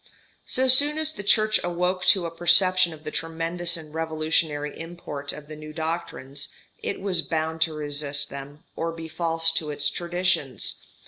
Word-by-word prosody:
So 260 0 +1
soon 285 +4 +6
as 315 0 0
the - - -6
Church 215 +1 +4
awoke 180 +1 -1
to 185 -3 +5
a 165 0 -6
perception 185 +1 +5
of 155 -1 -11
the 155 - -5
tremendous 165 +2 -1
and 155 -2 -11
revolutionary 155 -2 -1
import 160 -4 -6
of 150 -1 -10
the 155 - -8
new 155 0 -9
doctrines, 150 -3 -4 0.3
it - - -3
was 190 -4 +1
bound 160 0 -2
to 160 -1 +2
resist 145 -1 -1
them 140 +2 -8
or 165 0 -2
be 165 0 -7
false 165 0 +3
to 160 -2 -2
its 145 0 -1
traditions. 175 -6 -1
165 Hz, 170 wpm, -25 LUFS, 150-175 Hz, 0.3 s, soon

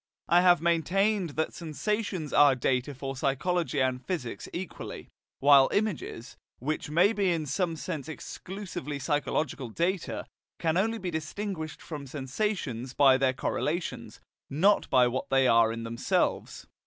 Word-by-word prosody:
I 175 +1 +5
have 175 -2 +5
maintained 180 +4 +2
that 160 0 -1
sensations 180 0 -3
are 145 -2 +6
data 130 +2 -1
for 135 +1 -5
psychology 150 +4 0
and 130 -1 0
physics 155 -11 -4
equally, 180 +2 -7 0.3
while 140 -1 +7
images, 200 - -2 0.2
which 150 +3 -3
may 175 +8 +4
be 200 -3 +1
in 165 -2 -1
some 170 +3 -1
sense 160 -2 -5
exclusively 175 -3 -6
psychological 140 -2 -1
data, 170 - -2 0.3
can 160 -1 0
only 225 +5 +1
be 185 -5 -4
distinguished 160 +1 -5
from 145 -4 -7
sensations 135 - -3
by 135 -2 +6
their 130 -1 +2
correlations, 160 +6 -3 0.3
not 190 +9 +3
by 125 -2 +5
what 125 +2 -3
they 135 -1 +4
are 115 -1 +5
in 115 0 -5
themselves. 115 +1 -1
155 Hz, 140 wpm, -28 LUFS, 135-180 Hz, 0.3 s, while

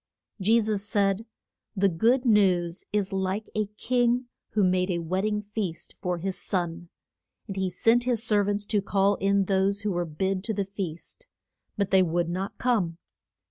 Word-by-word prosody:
Je 225 +5 +4
sus 210 -2 -1
said, 205 0 0 0.5
The 200 0 +3
good 230 +9 +2
news 185 -6 +2
is 205 -1 0
like 190 +2 -1
a 215 -1 0
king 245 0 +1 0.2
who 210 -2 +3
made 185 0 +2
a 175 - 0
wed 180 +4 -1
ding 210 -1 -1
feast 205 -5 -4
for 180 -1 -1
his 190 +2 -3
son. 175 -2 -3 0.6
And 195 - -6
he 190 -1 0
sent 230 +7 +2
his 240 -3 0
ser 210 -3 +3
vants 205 0 -1
to 205 - +2
call 200 0 +2
in 200 0 +2
those 195 +1 +1
who 210 -1 -1
were 175 -1 -1
bid 185 +4 -2
to 220 - -2
the 200 0 -1
feast. 195 - -6 0.5
But 200 -2 0
they 190 -1 +6
would 170 -1 0
not 190 +3 -4
come. 205 -10 0
195 Hz, 180 wpm, -27 LUFS, 185-215 Hz, 0.6 s, they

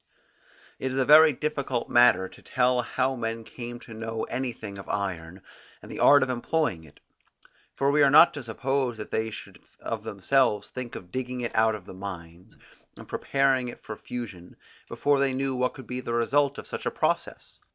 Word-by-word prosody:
It 130 - -2
is 130 - -3
a 135 - +2
very 155 +2 +8
difficult 140 -3 -2
matter 120 -6 +5
to - - -16
tell 125 0 +1
how 130 +2 -1
men 115 -1 -4
came 120 +1 -8
to 115 - -11
know 115 0 -4
anything 115 -6 -4
of 95 - -10
iron, 90 -2 -4 0.4
and - - -12
the - - -7
art 145 -2 +7
of 130 - -2
employing 125 - -1
it: 75 -2 -18 0.8
for 140 +1 +2
we 150 +1 +3
are 140 - +6
not 155 +4 +7
to 145 - -6
suppose 130 +1 -2
that 105 - -8
they 110 0 -1
should 110 - -10 0.2
of - - -4
themselves 105 - +1
think 125 -2 -6
of 90 -1 -10
digging 125 -1 -4
it 120 - -3
out 110 0 +3
of 100 -4 -10
the - - -10
mines, 90 -2 -9 0.4
and - - -12
preparing 135 -2 +1
it 120 - -9
for 110 - -6
fusion, 105 -8 -8 0.3
before 145 -1 +1
they 135 -1 +1
knew 135 0 -1
what 125 0 0
could 130 - -10
be 125 +1 -5
the 120 -2 -3
result 140 +4 +2
of - - -7
such - - -5
a - - +3
process. - - -2
120 Hz, 195 wpm, -26 LUFS, 110-135 Hz, 0.8 s, very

